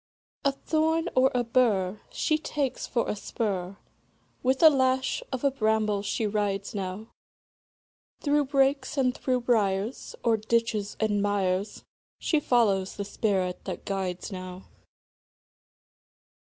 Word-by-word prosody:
A 280 - +3
thorn 320 +4 0
or 260 +1 +5
a 245 - +2
bur 215 -5 +1
She 310 0 0
takes 285 -4 -2
for 235 - 0
a - - -1
spur; 195 -3 -3 0.6
With 260 +4 +1
a 320 - +11
lash 260 -1 +1
of 260 -1 -3
a 280 - +3
bramble 215 -4 +1
she 205 +2 -1
rides 205 -1 -1
now, 195 +2 -5 1.1
Through 290 0 +2
brakes 275 +1 +1
and 255 -2 +2
through 255 -1 0
briars, 215 -1 0
O'er 230 -1 +4
ditches 220 -1 -1
and 210 -2 +1
mires, 200 -1 -1 0.3
She 315 - +1
follows 205 -9 +2
the 200 - -4
spirit 190 -3 -1
that - - -6
guides 190 -1 -3
now. 185 0 -7
220 Hz, 125 wpm, -27 LUFS, 200-260 Hz, 1.1 s, a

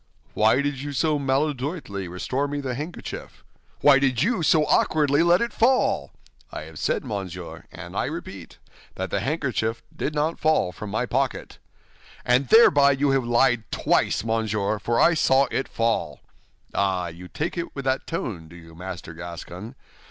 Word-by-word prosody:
"Why 110 +6 +3
did 140 -2 -2
you 145 0 -5
so 150 +2 +1
maladroitly 135 - -2
restore 125 +11 -2
me 145 0 -3
the 135 -3 -3
handkerchief?" 150 +7 -7 0.4
"Why 140 -2 +7
did 130 -1 +1
you 225 -2 +1
so 155 0 +4
awkwardly 150 -1 +3
let 175 +2 +4
it 235 -1 -1
fall?" 255 +3 +2 0.4
"I - - -6
have - - -10
said, - - -1
monsieur, 100 -7 -6
and - - -9
I - - 0
repeat, - - -7 0.4
that - - -4
the - - 0
handkerchief 120 -6 -2
did 150 - -3
not 155 +3 0
fall 155 -12 +2
from 105 +3 -8
my 110 +4 -1
pocket." 130 +1 -2 0.7
"And 125 +2 +3
thereby 145 - +6
you 140 +1 +1
have 135 -2 +1
lied 120 -1 +2
twice, - - +1
monsieur, 110 -2 -1
for 115 +3 0
I 170 - +5
saw 135 -3 +4
it 135 - -1
fall." 100 -11 -1 0.5
"Ah, 95 -3 0
you 85 +2 -10
take 155 - -3
it 170 -1 -5
with 140 -1 -5
that 130 0 0
tone, 95 - -4
do 85 - -14
you, 80 -1 -13
Master 85 -1 -7
Gascon? 85 +7 -8
130 Hz, 165 wpm, -24 LUFS, 105-145 Hz, 0.7 s, Why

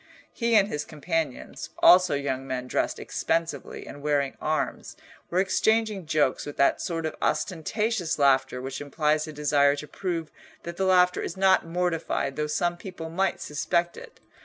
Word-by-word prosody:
He 235 -1 +1
and 200 -2 +5
his 150 -7 -3
companions, 155 -2 -4
also 180 -4 +6
young 135 -1 -3
men 130 -1 -3
dressed - - -1
expensively 165 -4 -2
and 145 - -10
wearing 145 -2 0
arms, 155 0 -2 0.3
were 175 - -2
exchanging 210 0 +1
jokes 150 -4 +1
with 145 - -8
that 140 - +3
sort 165 -2 -3
of 155 - -2
ostentatious 190 +1 -1
laughter 135 -3 +3
which 135 +1 -5
implies 150 +2 0
a - - -6
desire 145 -1 +3
to 150 +1 -7
prove 165 -2 -4 0.3
that 170 0 -7
the 190 - 0
laughter 180 -1 +4
is 175 - -5
not 190 -3 +4
mortified 165 -5 -1
though 150 0 -1
some 175 +3 0
people 170 -3 -8
might 190 +2 0
suspect 170 +3 -1
it. - - -12
160 Hz, 160 wpm, -26 LUFS, 145-180 Hz, 0.3 s, also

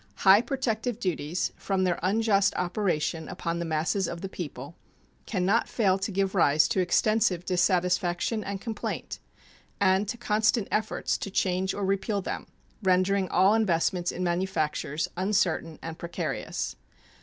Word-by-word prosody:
High 195 +3 +8
protective 245 -3 -2
duties, 175 -1 -2
from 190 -1 -1
their 180 -2 +1
unjust 200 +1 +2
operation 175 -4 -1
upon 170 0 -3
the 170 - -2
masses 165 +5 0
of 170 0 -6
the 195 - -4
people, 145 -4 -7 0.5
can 185 -5 -1
not 220 +5 +2
fail 195 -4 +2
to 200 +2 -2
give 195 0 0
rise 155 -5 +4
to - - 0
extensive 185 0 +2
dissatisfaction 180 +3 +1
and 200 0 -4
complaint 220 0 -5 0.6
and 190 +1 +3
to 235 - -4
constant 220 -1 +1
efforts 215 0 -1
to - - -4
change 190 0 0
or 200 - -2
repeal 195 +2 0
them, 190 - -5 0.3
rendering 185 0 +2
all 190 +3 +4
investments 180 -4 +1
in 185 - -4
manufactures 170 -3 -1
uncertain 185 -4 0
and 165 0 -6
precarious. 170 0 -4
190 Hz, 145 wpm, -27 LUFS, 175-205 Hz, 0.6 s, High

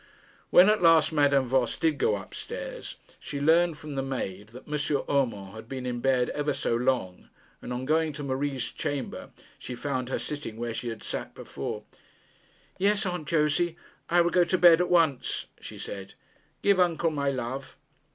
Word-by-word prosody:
When 180 - +8
at 215 -1 +3
last 165 -2 +6
Madame 145 -3 +3
Voss 125 -1 +1
did 160 -3 +1
go 105 - +3
up 100 -2 -8
stairs, - - -6 0.2
she 140 - -5
learned 165 +2 +3
from 150 -1 -8
the 135 - -1
maid 105 -7 -4
that 120 +4 -13
M. 150 -1 -1
Urmand 115 -9 0
had 110 +1 -10
been 130 -1 -5
in 120 -1 -2
bed 130 -1 +2
ever 150 0 -1
so 115 - -1
long; 120 -7 -1 0.3
and - - -7
on 125 +1 -3
going 160 +2 +2
to 145 - -6
Marie's 135 -2 -2
chamber, 145 -4 -4 0.3
she 125 - -6
found 130 -1 -3
her - - -1
sitting 145 -7 -5
where 120 0 -3
she 120 +1 -4
had 115 - -7
sat - - -5
before. - - -6 1.0
'Yes, 205 +2 +2
Aunt 180 -5 -3
Josey, 165 +2 +1 0.3
I 175 +1 +5
will 170 0 +2
go 180 - +5
to 175 +2 +1
bed 175 -1 +7
at 180 - 0
once,' 160 -7 +2
she - - -9
said. 95 -1 -7 0.5
'Give 200 -2 +4
uncle 170 -2 +2
my 140 -2 0
love.' 130 0 -4
140 Hz, 180 wpm, -27 LUFS, 125-165 Hz, 1.0 s, When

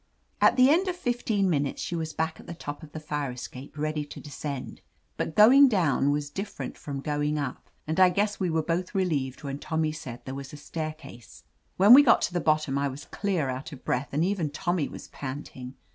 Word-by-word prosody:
At - - +6
the 255 +2 +7
end 360 +5 +3
of 365 - -1
fifteen 240 - 0
minutes 145 -5 0
she 175 - -3
was 160 -1 -3
back 160 +1 -2
at - - -13
the 170 - -6
top 145 -3 -7
of 155 -2 -12
the 155 - -6
fire 150 -2 -3
escape, 125 +3 -9
ready 155 0 -1
to - - -10
descend. 145 -1 -6 0.3
But 155 - -3
going 265 +7 +8
down 170 - +2
was 145 0 -1
different 200 +4 -5
from 140 -2 -6
going 150 0 -1
up, 140 -4 -5 0.2
and 160 +3 -2
I 185 -1 +8
guess 205 +3 0
we 185 -3 0
were 160 -1 +1
both 175 +4 -2
relieved 150 -8 -1
when 140 0 -4
Tommy 160 0 -1
said 130 -6 -8
there 130 - -5
was 135 +1 -7
a - - -7
staircase. 155 -5 -7 0.3
When 200 +5 +8
we 275 - +11
got 245 -5 +5
to - - -1
the 175 - +1
bottom, 155 -3 +1
I 140 - +1
was 135 +1 -7
clear 190 -8 -1
out 130 +5 -5
of 135 - -12
breath, 130 +3 -1
and 155 +4 +1
even 185 -5 0
Tommy 160 +1 -1
was - - -10
panting. 130 -1 -7
155 Hz, 220 wpm, -27 LUFS, 140-185 Hz, 0.3 s, we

